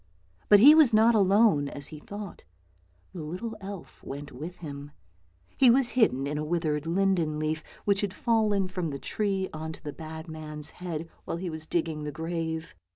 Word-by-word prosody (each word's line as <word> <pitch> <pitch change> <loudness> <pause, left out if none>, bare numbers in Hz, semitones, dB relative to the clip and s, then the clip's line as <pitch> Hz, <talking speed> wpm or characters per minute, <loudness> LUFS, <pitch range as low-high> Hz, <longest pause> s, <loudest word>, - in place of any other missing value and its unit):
But 205 - +8
he 280 +8 +10
was 300 -8 +6
not 225 +2 +6
alone, 200 -7 +4
as 140 0 -3
he 155 - -9
thought; 205 +4 -8 0.7
the 175 - -6
little 185 +9 -5
elf 195 -2 -9
went 145 +1 -7
with 160 +8 -7
him. 145 -4 -8 0.7
He 260 - +6
was 250 +1 +5
hidden 180 - +2
in 150 +1 -2
a - - -2
withered 155 -2 -1
linden 170 -3 +1
leaf 155 +1 -2 0.2
which 200 -1 +3
had 200 -2 -1
fallen 210 -3 +1
from 180 -3 -3
the 140 - -4
tree 195 +4 -1
on 160 0 -5
to - - -14
the 145 -2 -5
bad 160 +1 -8
man's 155 -1 -5
head 165 -3 -5 0.2
while - - -3
he 175 0 -4
was 155 0 -5
digging 160 -3 -1
the 150 - -4
grave. 160 0 -4
165 Hz, 185 wpm, -28 LUFS, 155-200 Hz, 0.7 s, he